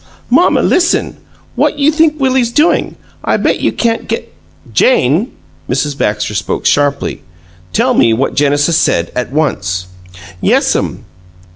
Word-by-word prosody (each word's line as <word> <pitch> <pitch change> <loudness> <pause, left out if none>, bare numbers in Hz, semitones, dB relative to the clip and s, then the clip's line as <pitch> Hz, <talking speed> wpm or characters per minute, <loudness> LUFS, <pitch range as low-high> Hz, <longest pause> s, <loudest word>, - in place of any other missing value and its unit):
"Mamma, - - +3
listen! 350 -1 +1 0.4
What - - +1
you 290 +1 +3
think 310 -1 +1
Willie's 260 -3 +1
doin'? 300 +7 +1 0.3
I - - +1
bet - - 0
you - - 0
can't 230 -1 -2
g 225 - -1 0.3
" 80 +8 -23
"Jane!" 170 - +2 0.4
Mrs 140 +3 -1
Baxter 105 -4 -1
spoke 105 - -3
sharply. 145 -1 0 0.5
"Tell - - +1
me 115 - +3
what 120 +5 0
Genesis 145 +3 +2
said, 85 0 0
at 125 0 -3
once." 95 - -1 0.6
"Yes'm. 100 +6 0
145 Hz, 135 wpm, -13 LUFS, -, 0.6 s, Mamma